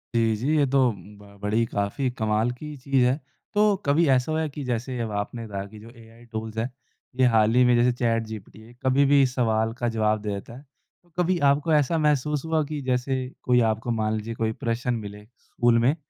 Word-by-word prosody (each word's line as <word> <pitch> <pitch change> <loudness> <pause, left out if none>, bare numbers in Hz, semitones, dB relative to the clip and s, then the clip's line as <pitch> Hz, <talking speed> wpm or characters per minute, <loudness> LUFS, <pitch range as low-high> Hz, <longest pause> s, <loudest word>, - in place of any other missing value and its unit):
जी 115 -1 +3
जी, 135 +9 0
ये 145 - +4
तो 135 +1 +2
ब 100 0 -14
बड़ी 110 +3 +1
काफ़ी 105 +6 -2
कमाल 110 0 0
की 150 +4 -8
चीज़ 135 -1 +1
है। 130 +4 +1 0.3
तो 210 0 +4
कभी 150 +4 +3
ऐसा 130 +3 +2
हुआ 160 - 0
है 155 - -2
कि, 145 +1 -7
जैसे 125 0 -3
अब 110 -2 -3
आपने 115 +3 -5
कहा 100 -2 -4
कि 105 +1 -12
जो 115 +2 -12
एआई 115 0 -16
टूल्स 110 0 -5
हैं, 115 +3 -1 0.5
ये 130 - +6
हाल 110 +1 +4
ही 125 - +6
में 125 - +4
जैसे 120 +1 +4
चैट 115 -2 0
जीपीटी 110 -1 -9
है। 115 +2 -15
कभी 135 +2 +4
भी 140 0 +5
सवाल 115 -3 0
का 120 - -1
जवाब 110 -1 0
दे 105 - -4
देता 110 +4 -8
है। 140 - -14 0.5
कभी 180 0 +2
आपको 150 +3 0
ऐसा 150 +2 +2
महसूस 150 -1 +1
हुआ 160 -1 +1
कि, 150 0 -5
जैसे 130 +1 -1 0.2
कोई 125 -1 +3
आपको 115 +2 -3
मान 110 -1 0
लीजिए 115 +2 -5
कोई 110 0 -1
प्रश्न 120 +1 0
मिले, 105 -2 -6 0.2
स्कूल 120 -1 +2
में 130 +6 +3
120 Hz, 215 wpm, -25 LUFS, 110-140 Hz, 0.5 s, ये